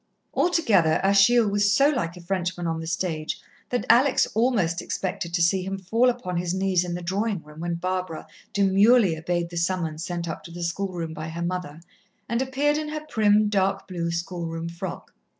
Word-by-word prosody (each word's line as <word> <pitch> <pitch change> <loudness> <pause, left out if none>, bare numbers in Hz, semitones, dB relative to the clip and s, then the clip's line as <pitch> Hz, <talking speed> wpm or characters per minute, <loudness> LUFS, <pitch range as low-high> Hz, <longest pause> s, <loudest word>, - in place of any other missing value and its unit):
Altogether 220 - +3
Achille 200 +5 +5
was 205 0 +2
so 275 +7 +5
like 180 - -2
a - - -10
Frenchman 180 -1 -2
on 165 -1 -1
the 160 - -6
stage 165 -3 -2 0.3
that 245 - -1
Alex 255 +4 +5
almost 215 -8 +1
expected 185 -2 -3
to 170 - +3
see 185 +3 +3
him 195 +1 -4
fall 225 +7 +2
upon 190 -8 -3
his 175 +1 -1
knees 190 -2 +1
in 175 -1 -4
the 175 - -6
drawing 195 +1 -1
room 150 +1 -14
when 170 0 -2
Barbara 185 -1 -3 0.3
demurely 200 0 +4
obeyed 170 +1 -2
the 170 - -6
summons 165 -2 -1
sent 175 -1 -4
up 165 - -5
to - - -9
the 175 +1 -6
schoolroom 170 -2 -3
by 155 0 -6
her 170 +1 -4
mother, 170 -3 -4 0.5
and 235 +2 0
appeared 285 +3 +1
in 305 -1 -4
her 305 0 -5
prim, 215 -6 +3
dark 195 -1 0
blue 170 -3 -3
schoolroom 170 -1 -4
frock. 170 0 -7
185 Hz, 185 wpm, -25 LUFS, 170-210 Hz, 0.5 s, Achille